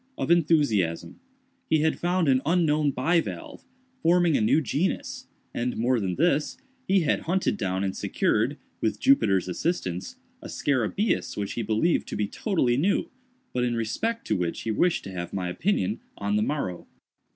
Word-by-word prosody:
—of - - -1
enthusiasm. 145 - +2 0.5
He 155 - +3
had 160 +1 +1
found 175 -1 +1
an 130 -1 +4
unknown 155 -2 +2
bivalve, 170 - -1 0.4
forming 175 -1 +4
a - - +2
new 110 +8 +4
genus, 155 - -2 0.3
and, 125 +1 -2
more 120 +2 +2
than 95 -4 -2
this, 155 -1 +1 0.3
he 195 -1 +4
had 155 - +1
hunted 185 - +1
down 95 -1 -2
and 95 -1 -2
secured, - - 0 0.2
with 105 -1 0
Jupiter's 105 -9 +3
assistance, 90 - -2 0.3
a - - -8
scarabæus 145 - 0
which 100 -1 -3
he 120 - -2
believed 110 +10 +1
to - - -5
be 105 - 0
totally 130 - 0
new, 185 +8 +1 0.4
but 125 - 0
in 120 -1 0
respect 225 - -2
to 110 - 0
which 90 -3 -2
he 115 - -2
wished 175 +10 +1
to 95 - -7
have 85 -2 -6
my 90 -2 -2
opinion 110 - 0 0.2
on 100 0 -1
the 105 - +2
morrow. 105 - -2
130 Hz, 165 wpm, -26 LUFS, 105-170 Hz, 0.5 s, an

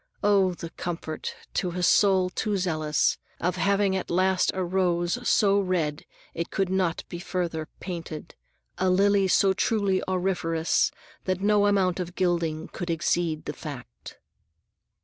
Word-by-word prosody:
—Oh, 195 -3 +3
the 165 -1 -7
comfort, 165 -2 -5 0.2
to 180 - 0
a 180 0 -3
soul 190 0 +4
too 210 +2 -1
zealous, 155 -5 +1 0.2
of 180 +1 -1
having 200 +1 +2
at 190 - -3
last 185 +1 +2
a 190 - -1
rose 175 +2 0
so 200 -2 +4
red 170 -6 -1 0.3
it 170 +1 -3
could 195 -1 -1
not 185 -3 0
be 175 - -7
further 170 -3 -3
painted, 165 -4 -6 0.5
a 185 - +2
lily 195 +1 +4
so 190 +1 +4
truly 200 -2 +1
auriferous 175 -3 +1 0.4
that 185 0 -1
no 205 0 +4
amount 190 -3 +2
of 175 0 -5
gilding 170 -3 0
could 175 -1 -6
exceed 165 -1 0
the - - -4
fact! 145 -6 -9
180 Hz, 145 wpm, -26 LUFS, 170-190 Hz, 0.5 s, soul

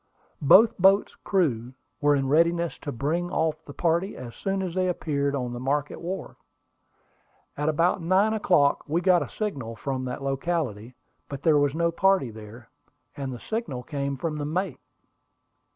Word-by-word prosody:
Both 195 - +6
boats' 195 +2 +4
crews 130 - 0 0.3
were 145 0 +4
in 135 -1 0
readiness 170 +3 +2
to 145 - -5
bring 160 +8 -1
off 160 -2 -1
the 145 - -11
party 170 +4 0
as 120 -2 -8
soon 195 0 -2
as 180 -3 -4
they 185 0 +1
appeared 140 -5 -1
on 125 -3 -3
the 120 - -5
Market 140 +3 -2
Wharf. 180 +1 -5 1.2
About 155 +5 +1
nine 190 +6 +3
o'clock 180 -9 +3
we 160 +3 +1
got 180 -1 +4
a - - -4
signal 135 - -4
from 130 +1 -3
that 125 +2 -5
locality, 135 -5 -2 0.3
but 140 -1 -7
there 155 -3 +5
was 145 0 +1
no 170 0 +1
party 190 -7 +2
there, 110 +2 -12 0.4
and 135 -2 -4
the 125 - -7
signal 160 - -4
came 140 -1 -3
from 150 +2 -3
the - - -2
mate. 170 0 -2
150 Hz, 165 wpm, -26 LUFS, 135-175 Hz, 1.2 s, Both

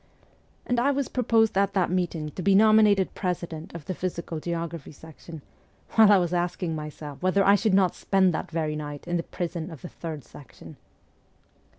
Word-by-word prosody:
And 245 -1 0
I 260 +4 +2
was 280 -1 -1
proposed 225 -3 +2
at 200 0 +1
that 185 -3 +1
meeting 170 -4 -2
to 185 - -6
be 195 +2 +3
nominated 215 -2 +5
president 170 -3 -4
of 165 -4 -8
the 185 - -3
Physical 170 -2 -4
Geography 170 -2 -5
section, 160 0 -12 0.5
while 220 -2 +6
I 205 - +7
was 175 -1 0
asking 175 -1 -1
myself 150 -2 -8
whether 185 +2 +2
I 200 - +6
should 205 -1 +2
not 190 -2 +3
spend 190 -2 +2
that - - -4
very 155 -2 -2
night 145 0 -7
in 175 0 0
the - - -1
prison 170 -1 -5
of 160 -6 -11
the 175 - -7
Third 155 -4 -7
Section. 140 - -14
175 Hz, 185 wpm, -26 LUFS, 160-195 Hz, 0.5 s, I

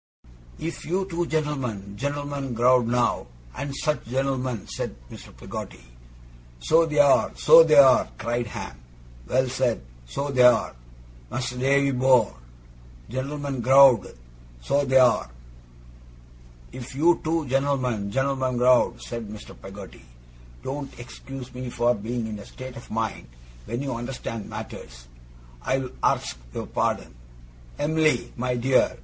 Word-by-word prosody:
'If 165 +1 -5
you 185 +3 -1
two 175 -2 -2
gent'lmen 125 -11 -3
gent'lmen 140 0 -4
growed 125 0 +4
now, 120 - 0 0.3
and 140 +1 -4
such 150 -2 -1
gent'lmen 130 -3 -2
' - - -7
said - - -4 0.2
Mr. - - -11
Peggotty. - - -8 0.8
'So 165 - +3
th' 150 -1 -3
are, 145 -1 +4
so 165 +2 +8
th' 160 -1 +2
are!' 135 -3 +7
cried 120 +1 -2
Ham. 65 - -7 0.5
'Well 130 +1 +1
said! 125 - -1 0.2
So 140 - -3
th' 130 - -2
are. 125 - +5 0.5
Mas'r 125 -1 -4
Davy 140 +1 +3
bor' 125 - +3 0.8
gent'lmen 140 0 -3
growed 130 - +5 0.4
so 140 - +1
th' 130 -1 -3
are!' 125 - +4 1.4
'If 130 +1 -9
you 165 +5 +3
two 160 0 0
gent'lmen, 130 -6 0
gent'lmen 135 0 0
growed,' 125 +1 +3
said 115 -2 -6
Mr. 105 0 -10
Peggotty, 95 -8 -11 0.6
'don't 140 0 -6
ex 120 - -10
cuse 135 -2 -9
me 125 0 -6
for 120 0 +2
being 115 +2 -4
in 110 -1 -6
a 100 - -10
state 130 -1 -9
of 115 - -11
mind, 110 - -3 0.4
when 120 +4 -3
you 135 -2 -3
understand 115 -2 -6
matters, - - -9 0.5
I'll 130 - -1
arks - - +1 0.2
your - - -3
pardon. - - -2 0.6
Em'ly, 155 +1 +1
my 125 +1 -1
dear! 130 +2 +2
130 Hz, 135 wpm, -25 LUFS, 120-140 Hz, 1.4 s, so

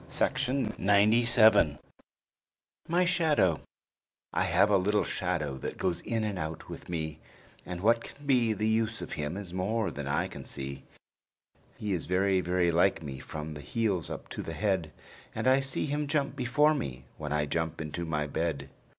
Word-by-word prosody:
JEMIMA 125 -4 0
LUKE 105 - +5 1.1
MY 175 +2 +3
SHADOW 150 - +2 0.7
I - - +2
have 105 - +3
a 100 - +6
little 105 +2 +2
shadow 80 -7 -2
that - - -5
goes 90 -2 0
in 115 -1 -2
and 105 -4 -2
out 80 0 -5
with - - -9
me, 80 -2 -3 0.5
And 90 -1 -5
what 115 +3 +4
can 145 - -12
be 125 -5 +3
the 110 +1 -1
use 110 -2 0
of - - -8
him 75 +4 -3
is 95 -4 -7
more 105 +4 0
than 70 -1 -5
I 70 - 0
can - - -9
see, 70 -1 -6 0.9
He 105 -2 -2
is 85 -5 -3
very, 95 +1 +2
very 90 -1 +2
like 85 0 +2
me 65 -3 -6
from 75 +3 -6
the 75 - -8
heels 95 - -1
up - - -6
to - - -5
the 80 - -5
head; 95 -3 0 0.4
And - - -1
I 130 +1 +6
see 135 -1 -2
him 145 0 -1
jump 140 -2 0
before 145 +4 +3
me, 65 - -4
when 75 -1 -4
I 75 0 +1
jump 80 +2 -2
into 80 +2 -4
my 75 -3 -1
bed. 70 -2 -3
95 Hz, 175 wpm, -29 LUFS, 80-115 Hz, 1.1 s, a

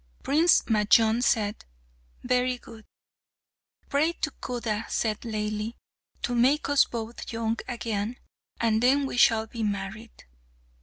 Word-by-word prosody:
Prince 320 +4 +4
Majnun 220 +1 +3
said, 215 -3 0 0.6
"Very 250 0 +1
good." 225 -2 -14 1.0
"Pray 310 +4 +1
to 310 - -3
Khuda," 230 -4 -4
said 215 -2 -1
Laili, 215 0 -3 0.5
"to 245 - -1
make 260 +6 +2
us 285 -1 +5
both 230 0 -6
young 225 0 -1
again, 230 -1 -3 0.4
and 225 -1 +2
then 275 +3 +3
we 270 - -4
shall 225 -2 +4
be 225 +1 -7
married." 210 +2 -5
230 Hz, 120 wpm, -27 LUFS, 220-250 Hz, 1.0 s, us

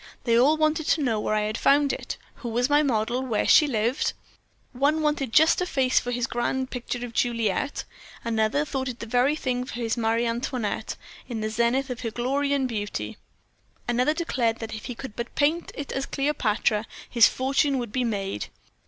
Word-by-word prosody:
They 230 -2 +2
all 275 +7 +5
wanted 310 0 +1
to 310 - +2
know 225 -5 +1
where 215 - 0
I 215 - +2
had 215 +1 -2
found 285 0 +4
it, - - -5 0.2
who 240 - -5
was 245 +4 0
my 295 +1 +6
model, 240 -2 0
where 240 -5 0
she 300 - +7
lived. 235 +1 0 0.6
One 290 +4 +1
wanted 295 -5 0
just 315 +5 +5
such 360 - -1
a - - -11
face 260 -2 +3
for 245 - -5
his 245 -1 0
grand 260 +1 -2
picture 245 0 -4
of 235 - -9
Juliet, 230 +2 0 0.4
another 230 +5 +1
thought 265 -3 -3
it 240 - -6
the 230 - -6
very 250 +5 +2
thing 250 -4 -1
for 250 - -8
his 235 -1 -1
Marie 230 +1 +1
Antoinette, 235 -1 -2 0.3
in 230 -3 -3
the 215 0 -2
zenith 240 +4 +1
of 245 - -5
her 230 - -2
glory 270 +5 -1
and 275 -2 +2
beauty. 205 - -4 0.7
Another 250 +5 +2
declared 245 -9 0
that 225 -1 -6
if 215 - -7
he 245 - -5
could 245 -3 -8
but 235 +1 -5
paint 310 +4 +1
it 285 - -5
as 270 0 -2
Cleopatra, 225 -6 0 0.2
his 235 -3 +6
fortune 270 +2 +1
would 240 -4 -4
be 255 +3 0
made. 195 - -2
245 Hz, 200 wpm, -25 LUFS, 230-275 Hz, 0.7 s, she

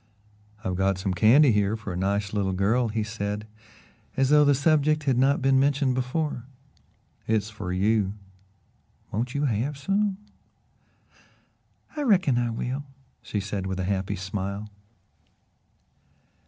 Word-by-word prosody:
"I've 95 - -2
got 95 0 +1
some 95 0 -2
candy 120 - +6
here 105 0 +1
for 105 -4 -6
a - - -5
nice 100 +2 -1
little 100 -2 0
girl," 110 +6 +2
he 110 0 -1
said, 105 -1 -4 0.7
as 135 -1 +2
though 150 0 +6
the 145 -1 +4
subject 155 +1 +2
had 135 -3 +2
not 135 +2 +2
been 135 0 +4
mentioned 140 -1 +2
before. 130 0 -2 0.8
"It's 110 -1 0
for 100 -4 -5
you. 100 +1 +1 1.0
Won't 120 +5 -3
you 145 +1 +1
have 130 +4 -1
some?" 195 +7 0 1.8
"I 300 - -3
reckon 185 - +3
I 120 -1 0
will," 125 +4 -3 0.4
she 105 - -3
said 95 -1 -4
with 95 0 -3
a - - -1
happy 95 0 -1
smile. 100 +2 -5
110 Hz, 140 wpm, -26 LUFS, 100-140 Hz, 1.8 s, candy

